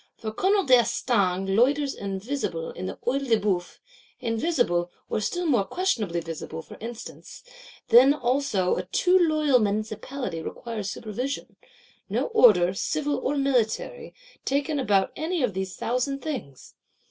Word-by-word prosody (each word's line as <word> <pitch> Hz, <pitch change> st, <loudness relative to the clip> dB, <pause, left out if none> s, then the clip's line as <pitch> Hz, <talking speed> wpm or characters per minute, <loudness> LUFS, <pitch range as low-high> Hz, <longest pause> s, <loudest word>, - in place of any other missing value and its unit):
For 220 Hz, -, -5 dB
Colonel 390 Hz, -, +2 dB
d'Estaing 200 Hz, -, +2 dB
loiters 275 Hz, +5 st, +3 dB
invisible 195 Hz, -4 st, -4 dB
in 95 Hz, -, -6 dB
the 95 Hz, -, -5 dB
Œil 275 Hz, +3 st, 0 dB
de 225 Hz, -2 st, +4 dB
Bœuf; 185 Hz, -4 st, -1 dB, 0.4 s
invisible, 230 Hz, -, 0 dB, 0.2 s
or -, -, 0 dB
still 355 Hz, +11 st, -2 dB
more 250 Hz, -10 st, +3 dB
questionably 215 Hz, -, -1 dB
visible, 160 Hz, 0 st, -6 dB
for -, -, -13 dB
instants: 230 Hz, -, -9 dB, 0.5 s
then 245 Hz, +4 st, +8 dB
also 250 Hz, -8 st, +1 dB
a -, -, -2 dB
too 365 Hz, 0 st, +2 dB
loyal 305 Hz, -6 st, +3 dB
Municipality 215 Hz, -1 st, -3 dB
requires 215 Hz, +3 st, -5 dB
supervision: 245 Hz, +8 st, -5 dB, 0.5 s
no -, -, 0 dB
order, 185 Hz, -, +6 dB
civil 290 Hz, +8 st, -1 dB
or 285 Hz, +2 st, -1 dB
military, 275 Hz, -, -1 dB, 0.3 s
taken 285 Hz, +2 st, 0 dB
about 200 Hz, -7 st, +2 dB
any 325 Hz, -1 st, -1 dB
of 230 Hz, -6 st, 0 dB
these 190 Hz, -1 st, -4 dB
thousand 260 Hz, +3 st, -2 dB
things! 235 Hz, -, -6 dB
240 Hz, 135 wpm, -26 LUFS, 195-280 Hz, 0.5 s, then